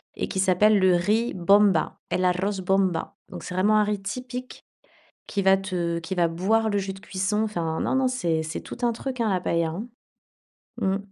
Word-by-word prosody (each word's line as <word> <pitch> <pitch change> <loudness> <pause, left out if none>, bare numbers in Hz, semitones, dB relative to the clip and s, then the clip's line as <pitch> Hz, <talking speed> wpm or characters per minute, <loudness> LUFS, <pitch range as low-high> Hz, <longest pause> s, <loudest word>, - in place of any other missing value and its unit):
et - - -3
qui 190 - -3
s'appelle 200 +3 +4
le 185 -1 +4
riz 215 +7 +1
bomba, 195 -1 +3
el 185 - 0
arroz 190 +2 0
bomba. 185 -2 0
Donc - - -8
c'est 180 - -6
vraiment 210 +3 +3
un 210 - +4
riz 205 -1 -2
typique, 250 +5 -6 0.6
qui 200 - -1
va 190 0 +5
te 175 -3 -2
qui 170 +3 -5
va 170 -1 +3
boire 215 +7 +1
le 205 - 0
jus 195 -1 -3
de 195 - -12
cuisson 200 +3 -1
enfin, 170 -7 -2
non - - 0
non, 265 -1 +2
c'est 170 -11 -1
c'est 160 - -5
tout - - -9
un 240 - +3
truc, 255 +1 -5
hein, 220 - +1
la 185 -2 +1
paëlla, 170 -2 0
hein. 200 +9 -6 0.9
Mmh. 190 0 +1
195 Hz, 205 wpm, -25 LUFS, 180-215 Hz, 0.9 s, va